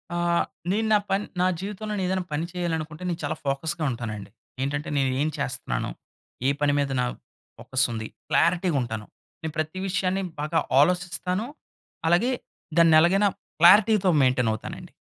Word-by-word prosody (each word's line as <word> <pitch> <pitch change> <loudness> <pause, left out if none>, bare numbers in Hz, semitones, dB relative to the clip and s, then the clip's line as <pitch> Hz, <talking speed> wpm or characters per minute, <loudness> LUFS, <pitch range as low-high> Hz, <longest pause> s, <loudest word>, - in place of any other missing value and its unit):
ఆహ్, 175 0 +2 0.3
నేను 220 +3 +1
నా 210 - +7
పన్ 195 +2 +1 0.2
నా - - +4
జీవితంలో 210 +2 -5
నెను 200 -2 -1
ఏదైనా 185 0 0
పని 155 +3 -1
చేయాలనుకుంటే 165 -2 -3
నేను 175 -1 -2
చాలా 155 - -1
ఫోకస్‌గా 155 +4 -1
ఉంటానండి. 110 -4 -5 0.3
ఏంటంటే 145 +2 -2
నేను 135 -1 +2
ఏం 150 - +2
చేస్తున్నాను? 130 - -2 0.6
ఏ - - +5
పని 145 -1 +3
మీద 140 -1 0
నా - - +1 0.5
ఫోకస్ 130 0 0
ఉంది? 110 -1 -4 0.2
క్లారిటీ‌గా 170 -2 +2
ఉంటాను. 110 -3 -4 0.4
నేను 160 -1 -4
ప్రతి 155 +4 -2
విషయాన్ని 190 0 0 0.2
బాగా 155 +2 +1 0.2
ఆలోచిస్తాను. 180 +4 +1 0.6
అలాగే 175 +10 +3 0.5
దాన్ని 165 -1 +7
ఎలాగైనా 195 +5 +4 0.3
క్లారిటీ‌తో 195 +3 +6
మెయింటైన్ 125 -3 +3
అవుతానండి. 110 - -8
165 Hz, 145 wpm, -25 LUFS, 140-185 Hz, 0.6 s, నా